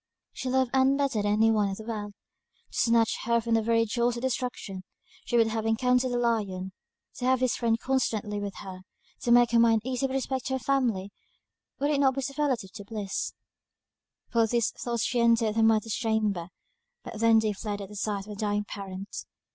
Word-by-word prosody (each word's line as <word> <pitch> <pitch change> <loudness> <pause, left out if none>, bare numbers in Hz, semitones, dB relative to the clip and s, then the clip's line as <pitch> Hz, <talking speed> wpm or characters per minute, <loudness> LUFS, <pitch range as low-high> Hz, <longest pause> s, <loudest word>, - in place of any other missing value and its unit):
She 260 - -4
loved 260 -1 +1
Ann 265 +1 +4
better 275 -6 0
than 205 0 0
any 220 +1 +4
one 210 -2 +2
in 195 - -3
the 220 - -8
world 210 -2 -5 0.6
to - - -3
snatch 230 -1 +3
her 235 0 +3
from 230 0 -2
the 225 - +4
very 230 +1 +2
jaws 240 +1 0
of 235 - -6
destruction 245 -7 -3 0.4
she 240 - +1
would 230 - +5
have 220 0 -2
encountered 250 +3 +2
a 245 - 0
lion. 205 -6 -1 0.5
To 250 - -3
have 260 0 +3
this 255 -1 +1
friend 230 -1 +1
constantly 225 -6 -1
with 200 -1 -5
her; 185 -2 -8 0.4
to 240 - -1
make 240 0 +6
her 235 - +4
mind 225 -2 +4
easy 260 +1 0
with 265 - -4
respect 265 -1 -2
to 265 - -2
her 265 - 0
family, 230 -7 0 0.7
would 285 +2 0
it 285 - +1
not 265 -2 +3
be 275 - -1
superlative 265 -7 -1 0.2
bliss? 205 -3 -3 1.0
Full 235 - +3
of 225 - +2
these 235 -1 +1
thoughts 235 -2 -3
she 245 - 0
entered 230 -2 +3
her 225 - +2
mother's 225 -1 +3
chamber, 215 -7 0 0.6
but - - -8
they 220 - -8
then 225 0 +5
fled 205 0 -4
at 195 -1 -7
the 210 - -11
sight 205 -1 -2
of 210 - -9
a - - -6
dying 205 0 -1
parent. 195 -1 -7
230 Hz, 210 wpm, -28 LUFS, 210-250 Hz, 1.0 s, make